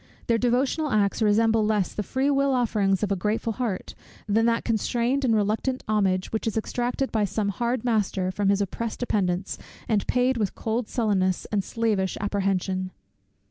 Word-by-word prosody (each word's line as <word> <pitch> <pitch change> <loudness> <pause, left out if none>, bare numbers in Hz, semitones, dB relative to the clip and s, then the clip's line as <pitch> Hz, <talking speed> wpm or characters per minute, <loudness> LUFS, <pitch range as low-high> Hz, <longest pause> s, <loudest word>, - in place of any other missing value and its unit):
Their 230 -1 +2
devotional 260 +6 +1
acts 205 -2 +1
resemble 220 +1 +3
less 210 -3 +1
the - - -2
free 265 +8 0
will 275 0 +2
offerings 210 -5 +1
of 205 - 0
a - - +3
grateful 215 +4 -1
heart, 220 -6 -3 0.3
than 225 +3 +3
that 230 0 +1
constrained 240 +4 0
and 235 -4 +3
reluctant 220 +5 0
homage, 195 -4 +1
which 220 +1 -2
is 225 - -1
exacted 245 +4 -1
by 220 -2 +1
some 200 +1 -1
hard 235 +4 -1
master 200 -5 0
from 195 +1 0
his 200 0 +2
oppressed 220 +3 -3
dependents, 190 -6 -1 0.3
and 210 -3 +1
paid 250 0 +2
with 210 -4 -1
cold 225 +1 -2
sullenness, 195 -6 0
and 205 -2 +1
slavish 210 -5 -1
apprehension. 190 -2 -1
215 Hz, 170 wpm, -25 LUFS, 200-235 Hz, 0.3 s, resemble